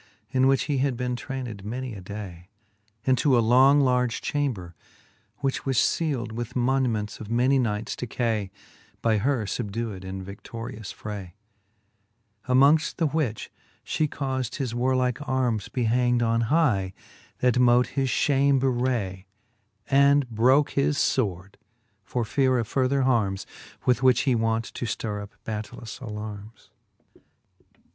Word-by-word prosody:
In 130 -1 +3
which 135 -1 +3
he 145 -3 -1
had 135 -2 0
been 125 0 -2
trayncd 125 -6 -6
many 125 +3 -4
a 100 - -8
day. 90 -2 -8 0.6
Into 130 0 +3
a - - +5
long 130 +5 +5
large 125 -3 +1
chamber, 120 -13 -2 0.7
which 135 -1 -1
was 135 -2 -1 0.2
field 135 -8 -2
With 120 +1 -5
moniments 120 -4 0
of 110 - -8
many 125 +4 +3
knights 110 -3 -1
decay, 110 -4 -2 0.5
By 110 -2 +3
her 125 0 0
fubdewed 105 -2 -4
in 95 0 -6
vidlorious 110 +1 -8
fi 105 - -8
ay: 95 -4 -7 1.1
Among 140 +5 +6 0.2
the 165 - +1
which 145 -8 -2 0.3
fhe 155 -1 0
caufd 130 -3 -3
his 130 -5 -3
warlike 125 +1 +1
armes 125 -5 0
Be 125 -3 -1
hangd 120 +1 +2
on 115 0 +2
high, 115 - +2 0.4
that 125 0 +2
mote 125 0 +4
his 135 -2 -1
ftiame 140 0 +3
bewray; 120 -7 -1 0.6
And 140 0 +4
broke 130 +6 +3
his 140 +1 +1
fword, 100 -8 -1 0.5
for 115 +5 -2
feare 130 +2 +2
of 115 -3 -1
further 135 +2 +1
harmes. 110 -7 +1 0.4
With 125 0 +3
which 130 -1 +4
he 135 - +2
wont 115 0 0
to - - -4
ftirre 105 -2 -3
up 100 0 -11
battailous 110 +2 -6
alarmes. 105 -1 -8
120 Hz, 140 wpm, -26 LUFS, 105-130 Hz, 1.1 s, Among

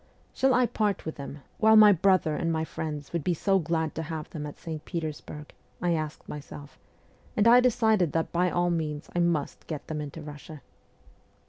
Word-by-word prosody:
' - - -35
Shall 265 -1 +3
I 250 0 +4
part 210 -3 -1
with 160 - -5
them, 140 0 -8 0.2
while 220 0 +6
my 215 -1 +9
brother 185 -4 +3
and 165 +1 -1
my 160 0 -1
friends 150 -2 -6
would 170 -3 -1
be 175 +2 +1
so 195 +4 +2
glad 160 -1 -1
to - - -4
have 160 -1 -5
them 150 -2 -5
at 145 - -9
St. 160 -3 -6
Peters 160 -4 -4
burg? 150 0 -10 0.2
' - - -36
I 175 -1 +1
asked 155 -2 -4
myself; 145 0 -9 0.6
and 210 +1 +4
I 240 +1 +8
decided 220 - +3
that 165 0 -1
by 180 +1 +2
all 175 0 +1
means 150 -3 -3
I - - +2
must 170 -4 -1
get 155 -3 -5
them 155 -1 -4
into 150 +2 -7
Russia. 150 -1 -10
160 Hz, 210 wpm, -27 LUFS, 150-185 Hz, 0.6 s, my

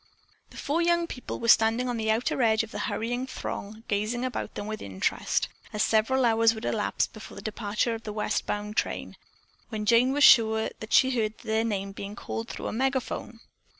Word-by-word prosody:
The - - -14
four 310 +4 0
young 340 0 +2
people 250 -6 -6
were 230 - -3
standing 225 +2 +4
on 245 - -1
the 220 -1 -1
outer 225 +4 +1
edge 220 -1 +3
of 225 - -9
the - - -5
hurrying 245 +3 -2
throng, 215 -3 -6
gazing 215 +5 -1
about 255 - -4
them - - -4
with 215 0 -5
interest 95 -1 -1 0.3
(as 210 - +1
several 245 +4 +2
hours 225 0 +4
would 220 - -6
elapse - - 0
before - - -11
the - - -9
departure 215 +1 -1
of 225 - -5
the 215 - -6
west 210 0 -2
bound 210 0 -3
train), - - -2 0.5
when 215 -2 -4
Jane 235 +3 +4
was 290 +1 +2
sure 220 -4 +6
that 220 - -8
she 260 0 +6
heard 220 -3 -1
their 220 +1 +1
name 200 -3 -2
being 200 +1 -7
called 225 +2 -5
through - - -6
a - - -3
megaphone. 255 -2 -2
225 Hz, 200 wpm, -27 LUFS, 215-245 Hz, 0.5 s, sure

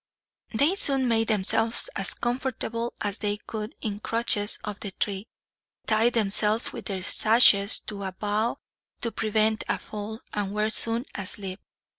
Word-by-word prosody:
They 285 +10 +2
soon 275 -9 +2
made 225 -1 +1
themselves 225 +2 +2
as 195 - 0
comfortable 240 -1 -3
as 205 0 -3
they 205 -1 -2
could 215 +1 -7
in 205 -2 -4
crutches 220 -2 0
of 210 -1 -6
the 205 - -5
tree, 200 +2 -3 0.6
tied 225 +2 +2
themselves 215 0 +3
with - - -8
their 190 -3 -4
sashes 215 -1 +5
to 205 -2 -7
a 190 -1 -4
bough 210 +4 -2 0.4
to 230 - -2
prevent 220 0 +1
a - - +1
fall, 215 +2 -7
and 205 -1 -3
were 215 +1 0
soon 230 +2 +2
asleep. 195 0 -6
215 Hz, 150 wpm, -26 LUFS, 205-230 Hz, 0.6 s, sashes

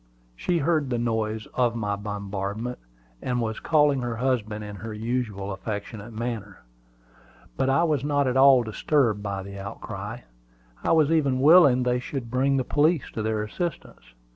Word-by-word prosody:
She 175 - 0
heard 155 -3 +1
the 120 - 0
noise 110 -2 -1
of 120 -2 +1
my 105 -3 -1
bombardment, 100 +3 -4 0.4
and 125 -1 -1
was 110 -2 -2
calling 150 -4 +3
her 120 -1 -3
husband 110 -4 -1
in 105 -1 -7
her 110 +1 -7
usual 110 -3 -3
affectionate 105 +2 -6
manner. 110 -3 -5 0.9
But 130 - 0
I 135 +5 +3
was 150 -6 +1
not 145 -1 +1
at 130 -1 0
all 135 -2 +7
disturbed 115 -1 +1
by 100 -2 -4
the 100 0 -8
outcry. 100 0 -7 0.6
I - - +1
was 160 -2 +4
even 140 -5 +2
willing 140 -4 +6
they 125 0 +1
should 125 -2 -6
bring 135 +2 +2
the 130 - +1
police 150 +3 +1
to 110 - -4
their 110 0 -1
assistance. 140 - -6
120 Hz, 165 wpm, -25 LUFS, 105-135 Hz, 0.9 s, all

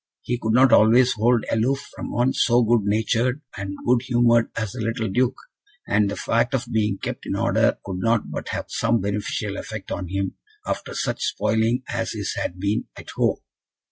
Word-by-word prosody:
He 120 0 -2
could 110 -1 -1
not 130 0 +5
always 120 +4 +6
hold 115 +1 +2
aloof 130 +5 0
from - - -6
one 125 +2 +1
so 120 0 +3
good 115 -2 +2
natured 115 +5 +1 0.2
and 100 -1 -5
good 125 -1 +3
humoured 120 -2 +3
as 110 -4 -2
the 125 - -6
little 115 +1 -1
Duke; 125 +6 +1 0.5
and 105 0 +2
the 100 - -3
fact 115 +4 +1
of 125 -1 -1
being 105 -3 +1
kept - - -5
in - - -1
order - - +2
could 95 -2 -4
not 115 +2 +1
but - - -5
have - - -3
some 115 0 +1
beneficial 100 +1 -2
effect 110 -3 -7
on 90 - -3
him, 95 +2 -3 0.3
after - - -4
such - - -2
spoiling 115 +3 +1
as 115 -1 -2
his 105 -3 -3
had 85 - -3
been 100 +2 0
at - - -9
home. - - 0
115 Hz, 190 wpm, -23 LUFS, 105-120 Hz, 0.5 s, always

